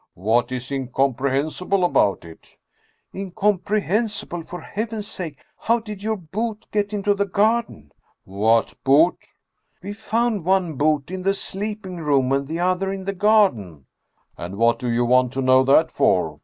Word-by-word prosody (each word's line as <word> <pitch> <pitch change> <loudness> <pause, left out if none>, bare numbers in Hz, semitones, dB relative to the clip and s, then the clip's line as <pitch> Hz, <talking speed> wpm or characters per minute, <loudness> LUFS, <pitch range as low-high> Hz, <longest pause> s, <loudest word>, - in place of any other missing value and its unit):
" - - -62
What 115 +6 +1
is 130 +1 -5
incomprehensible 140 +7 -1
about 100 - +2
it? 80 -1 -15 0.2
" - - -39
" - - -49
Incomprehensible! 205 0 -1
For 180 +2 -8
Heaven's 215 0 -4
sake, 165 -9 -6 0.2
how 230 +1 +2
did 210 -3 -9
your 220 +1 -1
boot 215 +6 -5
get 205 -1 -1
into 205 -1 +1
the 200 0 -1
garden? 205 - 0 0.2
" - - -56
"What 110 +4 +1
boot?" 150 +6 +4 0.3
" - - -45
We 200 +2 -5
found 220 -2 -1
one 185 -2 +1
boot 150 +2 0
in 185 0 -4
the 195 +2 +1
sleeping 200 -1 -5
room 140 -5 +1
and 140 0 0
the 160 +3 -4
other 185 +2 0
in 195 -1 -5
the 195 +1 -3
garden." 180 - +2 0.3
" - - -43
And 90 +3 -6
what 115 +1 +2
do 125 - -3
you 120 +1 +1
want 125 +1 +3
to 135 - -2
know 130 0 +5
that 155 +4 +4
for 80 -5 +1
175 Hz, 175 wpm, -22 LUFS, 130-205 Hz, 0.3 s, know